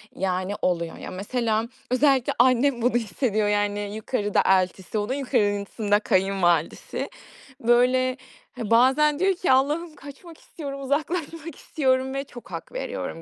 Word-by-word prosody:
yani, 185 Hz, +1 st, -1 dB
oluyor. 170 Hz, -2 st, -1 dB
Ya, -, -, -8 dB
mesela 220 Hz, +3 st, -1 dB, 0.3 s
özellikle 265 Hz, -1 st, +3 dB
annem 255 Hz, 0 st, +3 dB
bunu 245 Hz, +2 st, +2 dB
hissediyor, 215 Hz, -1 st, 0 dB
yani, 205 Hz, 0 st, 0 dB, 0.2 s
yukarıda 215 Hz, -1 st, 0 dB
eltisi, 185 Hz, +2 st, +1 dB
onun 210 Hz, +4 st, -1 dB
yukarısında 205 Hz, -5 st, 0 dB
kayınvalidesi. 185 Hz, -5 st, 0 dB, 0.5 s
Böyle 255 Hz, +1 st, +3 dB, 0.4 s
bazen 260 Hz, +7 st, +3 dB
diyor 385 Hz, +1 st, +3 dB
ki, 355 Hz, -, 0 dB
"Allah'ım, 300 Hz, +5 st, +1 dB
kaçmak 290 Hz, +4 st, -12 dB
istiyorum, 275 Hz, -3 st, -8 dB
uzaklaşmak 315 Hz, +2 st, -3 dB
istiyorum." 260 Hz, -2 st, 0 dB
ve 275 Hz, -, -2 dB
çok 245 Hz, -3 st, -13 dB
hak -, -, -7 dB
veriyorum -, -, -5 dB
250 Hz, 125 wpm, -24 LUFS, 205-280 Hz, 0.5 s, özellikle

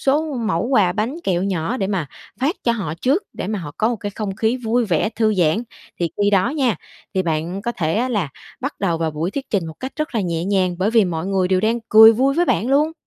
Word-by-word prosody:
số 295 Hz, +2 st, +1 dB
mẩu 205 Hz, -8 st, 0 dB
quà 210 Hz, -9 st, +3 dB
bánh 220 Hz, +7 st, -2 dB
kẹo 180 Hz, -1 st, +1 dB
nhỏ 195 Hz, +4 st, -1 dB
để 195 Hz, -6 st, -1 dB
mà 190 Hz, -6 st, -1 dB, 0.3 s
phát 285 Hz, +7 st, +1 dB
cho 235 Hz, -, +3 dB
họ 195 Hz, -9 st, -3 dB
trước, 285 Hz, +10 st, +2 dB
để -, -, -5 dB
mà 210 Hz, +1 st, -2 dB
họ 160 Hz, -5 st, -6 dB
có 220 Hz, -, +2 dB
một 240 Hz, -, -1 dB
cái 205 Hz, -1 st, -5 dB
không 200 Hz, -2 st, -5 dB
khí 225 Hz, +2 st, +1 dB
vui 240 Hz, 0 st, 0 dB
vẻ, 185 Hz, 0 st, +1 dB
thư 220 Hz, -1 st, +1 dB
giãn. 180 Hz, +4 st, +2 dB, 0.4 s
Thì 170 Hz, -, +1 dB
khi 205 Hz, -, +3 dB
đó 190 Hz, -2 st, +3 dB
nha, 265 Hz, -, +1 dB, 0.4 s
thì 190 Hz, -, +2 dB
bạn 170 Hz, +3 st, -2 dB
có 240 Hz, -, -2 dB
thể 160 Hz, -7 st, -1 dB
á 245 Hz, +4 st, +1 dB
là 205 Hz, -, -1 dB, 0.3 s
bắt 275 Hz, +3 st, -3 dB
đầu 170 Hz, -4 st, 0 dB
vào 160 Hz, -1 st, 0 dB
buổi 155 Hz, +4 st, -2 dB
thuyết 275 Hz, +5 st, -6 dB
trình 190 Hz, -6 st, 0 dB
một 160 Hz, -, -7 dB
cách 260 Hz, +1 st, -5 dB
rất 305 Hz, -3 st, -3 dB
là 225 Hz, -, +1 dB
nhẹ 170 Hz, -3 st, -2 dB
nhàng 185 Hz, -2 st, +1 dB
bởi 195 Hz, +3 st, +1 dB
vì 225 Hz, -2 st, +4 dB
mọi 170 Hz, -1 st, -3 dB
người 190 Hz, -2 st, +1 dB
đều 185 Hz, 0 st, +2 dB
đang 225 Hz, +3 st, +1 dB
cười 220 Hz, +1 st, +9 dB
vui 265 Hz, +4 st, +2 dB
với 345 Hz, +3 st, +3 dB
bạn 235 Hz, -, 0 dB
luôn. 295 Hz, +4 st, +3 dB
205 Hz, 260 wpm, -20 LUFS, 180-240 Hz, 0.4 s, cười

